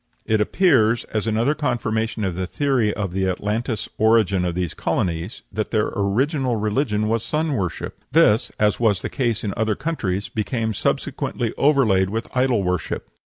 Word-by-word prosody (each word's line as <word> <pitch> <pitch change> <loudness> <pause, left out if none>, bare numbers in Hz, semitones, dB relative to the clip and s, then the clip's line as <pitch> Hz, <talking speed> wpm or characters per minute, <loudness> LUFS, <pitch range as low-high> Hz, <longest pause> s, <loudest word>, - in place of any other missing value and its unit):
It 110 -1 +2
appears, 120 - +3
as 110 0 -1
another 115 +6 +2
confirmation 115 -6 -1
of 95 -3 -1
the 90 +1 -3
theory 130 -3 +1
of 100 -4 -3
the 95 0 0
Atlantis 105 +4 -2
origin 110 -4 +3
of 85 -1 -2
these 90 -2 -2
colonies, 85 +4 -2
that 110 +1 -2
their 110 -2 0
original 125 - +1
religion 110 0 0
was 115 0 +1
sun 155 0 -1
worship; 95 - -3
this, 120 -7 +4
as 105 0 +2
was 105 -6 +2
the - - -2
case 120 -5 -1
in 100 -3 -2
other 110 -1 0
countries, 100 - -2
became 110 0 -2
subsequently 115 +3 -2
overlaid 115 -10 +3
with 115 +4 -5
idol 125 -5 +2
worship. 90 -3 -2
110 Hz, 160 wpm, -22 LUFS, 100-120 Hz, -, this